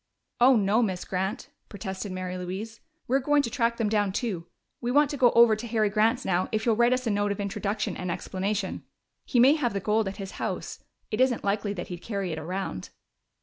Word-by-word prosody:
"Oh 255 +2 +7
no, 210 +1 +3
Miss 190 -6 -1
Grant!" 190 +2 -3 0.2
protested 195 -1 -5
Mary 185 0 -4
Louise. 190 +5 -5 0.3
"We're 265 +3 +3
going 290 +2 +2
to 230 - -3
track 235 -3 +1
them 225 - 0
down 205 -2 +1
too. 190 -5 -3 0.3
We 240 - -2
want 285 +2 +4
to - - -3
go 250 -2 +6
over 235 -2 +7
to 225 +3 -6
Harry 215 -2 +1
Grant's 225 +4 +2
now, 185 -1 +1
if 215 0 -1
you'll 230 -2 +3
write 235 +2 +4
us 255 0 0
a 225 - +1
note 205 0 +1
of 200 - -4
introduction 205 +1 -2
and 180 - -4
explanation. 190 +2 -3 0.4
He 245 - +1
may 260 +4 +7
have 260 -8 0
the 200 - -1
gold 215 +2 +1
at 195 - -5
his 195 -2 -6
house - - -4 0.3
it - - 0
isn't 255 -2 +2
likely 200 0 0
that 175 -3 -6
he'd 175 -1 -6
carry 200 -5 -3
it 160 - -3
around." 175 - -4
210 Hz, 220 wpm, -27 LUFS, 190-235 Hz, 0.4 s, Oh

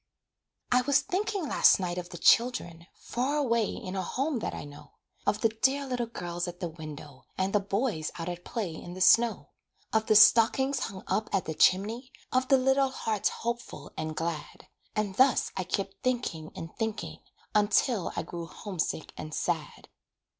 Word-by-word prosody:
I 250 0 +5
was 280 +2 +3
thinking 395 -2 -2
last - - +5
night 180 -1 -2
of 175 0 -7
the 175 - -8
children 175 -8 +2
Far 260 +4 -2
away 235 -6 +2
in 185 +1 -6
a 190 - 0
home 270 - -1
that - - -3
I - - -6
know, 145 0 -13 0.3
Of 210 - +1
the 225 - +4
dear 265 +6 +1
little 250 -3 -2
girls 175 -5 -4
at 175 0 -7
the 180 - -2
window, 150 -4 -10
And 190 +1 0
the 210 - +4
boys 200 -4 -1
out 165 0 -5
at 175 0 -5
play 205 -7 -3
in 175 +2 -8
the - - -7
snow; 230 +4 +4 0.4
Of 220 0 +2
the 215 - +4
stockings 245 +5 +6
hung 190 -5 -5
up 215 - -1
at 195 -3 0
the 160 - -3
chimney, 220 - +2 0.2
Of 255 0 +1
the 270 - +6
little 265 +1 +3
hearts 220 -5 -1
hopeful 235 +1 -5
and 155 0 -4
glad; 165 -2 -5 0.3
And 210 -2 -1
thus 260 0 +4
I 190 -1 -2
kept 195 +1 -3
thinking 235 -11 -2
and 165 - -8
thinking, 225 -1 -4 0.3
Until 210 0 +2
I - - -2
grew 170 -1 -7
homesick 165 -1 -4
and 155 0 -6
sad. - - -3
210 Hz, 180 wpm, -29 LUFS, 175-250 Hz, 0.4 s, stockings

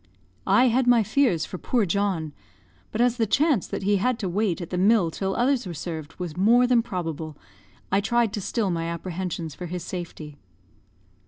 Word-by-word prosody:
I 245 +6 +5
had 250 +2 +1
my 240 -2 +5
fears 215 - +2
for 185 - -7
poor 240 -5 +1
John; 185 -5 -1 0.6
but 220 - -1
as 245 0 +2
the 225 -2 +1
chance 280 - +2
that - - -4
he 205 +1 +3
had 250 +5 +1
to 195 -5 -3
wait 195 -1 0
at 175 - -7
the 180 - -1
mill 195 -3 +4
till 195 +3 -2
others 250 -2 +1
were 175 - -6
served 160 -1 -6
was 175 -4 -6
more 230 +7 +4
than 245 -1 +4
probable, 165 -7 -5 0.5
I 195 +2 +3
tried 235 +1 +1
to 210 - -3
still 205 0 -1
my 165 -1 -2
apprehensions 170 -1 -4
for 180 - -7
his 175 0 -5
safety. 160 -5 -7
195 Hz, 190 wpm, -25 LUFS, 170-235 Hz, 0.6 s, I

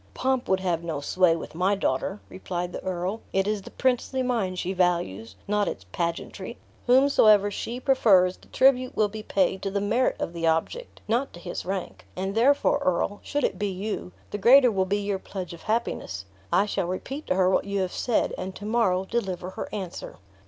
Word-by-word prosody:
"Pomp 260 -1 0
would 190 0 +2
have 170 -3 -1
no 165 -4 -3
sway 170 +3 +3
with 165 - -7
my 185 +5 +2
daughter," 190 +3 -1
replied 180 -1 -5
the - - -6
earl; 185 +3 -3
"it 195 +1 +1
is 210 -1 -1
the - - -11
princely 260 +1 0
mind 220 -8 -1
she 185 +2 -2
values, 170 - 0
not 210 0 +1
its 95 - -4
pagentry. 180 +6 -4 0.3
Whomsoever 225 -6 +5
she 235 +4 -4
prefers 195 -9 +4
the - - -21
tribute 255 -1 +3
will 210 -1 +3
be 215 +1 -7
paid 190 -2 0
to 195 - -2
the 200 +1 -1
merit 220 +6 +1
of 170 - -3
the 165 -1 -1
object, 165 - -1
not 240 +5 0
to 175 - -10
his 175 0 -6
rank; 190 -1 -4
and 190 +2 -3
therefore, 280 +5 +3
earl, 185 +3 0
should 290 -1 -2
it 185 - 0
be 205 -1 0
you, 190 - -4 0.2
the 205 - -3
greater 250 +3 +7
will 190 -2 +1
be 200 +2 0
your 200 -1 -2
pledge 185 -3 -6
of 170 - -11
happiness. 215 - -2 0.3
I 200 - +4
shall 195 -3 -2
repeat 265 - -5
to - - +1
her 185 0 +3
what - - +2
you 200 -1 -1
have 185 -1 -2
said; 240 - 0
and 185 0 -5
to 205 - -8
morrow 210 -5 +1
deliver 190 -5 -3
her - - -6
answer." 190 -4 -6
195 Hz, 200 wpm, -26 LUFS, 180-225 Hz, 0.3 s, greater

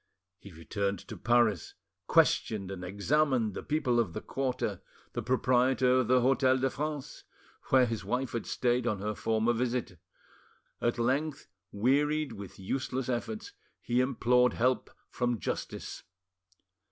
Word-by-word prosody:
He 100 - -12
returned 100 +4 -2
to - - -6
Paris, 120 -2 +2 0.3
questioned 100 -4 +2
and 95 -2 -6
examined 115 +4 +1
the - - -5
people 145 -6 +1
of 105 -8 0
the - - -4
quarter, 135 -2 -2 0.3
the - - -2
proprietor 130 0 +3
of 125 - 0
the 125 0 +4
Hotel 130 +1 +3
de 130 0 0
France, 150 -1 -5 0.4
where 130 -1 +5
his 115 -3 -3
wife 125 +6 -2
had 115 - -4
stayed 125 0 +1
on 105 - 0
her 105 +2 -2
former 110 +2 +1
visit; 120 -6 -2 0.8
at 120 +1 +1
length, 135 +5 -1 0.2
wearied 145 +7 +1
with 100 -4 -9
useless 130 +5 -3
efforts, 120 -3 -3 0.3
he 120 +1 +1
implored 125 -1 +3
help 125 +2 +1 0.2
from 120 -1 0
justice. - - -5
125 Hz, 140 wpm, -30 LUFS, 110-130 Hz, 0.8 s, where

